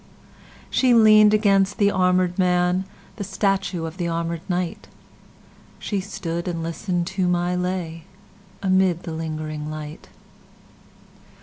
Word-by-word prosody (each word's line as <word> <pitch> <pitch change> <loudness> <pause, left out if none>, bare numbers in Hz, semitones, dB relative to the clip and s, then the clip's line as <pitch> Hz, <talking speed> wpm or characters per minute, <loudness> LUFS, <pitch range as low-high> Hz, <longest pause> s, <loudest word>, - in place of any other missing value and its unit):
She 250 -2 +4
lean'd 215 -2 +7
against 200 -2 +3
the 200 -3 +4
armèd 180 -1 +1
man, 180 0 +2 0.3
The 205 - -3
statue 195 -3 -1
of 165 +2 -7
the 175 - -2
armèd 165 0 -2
knight; 180 -1 -2 0.9
She 205 - -3
stood 170 -3 -5
and 165 -2 -3
listen'd 175 +1 -2
to 185 -2 0
my 175 0 +1
lay, 180 -3 -3 0.6
Amid 185 -2 +2
the 170 - -6
lingering 155 -1 -5
light. 155 0 -8
180 Hz, 120 wpm, -23 LUFS, 165-195 Hz, 0.9 s, lean'd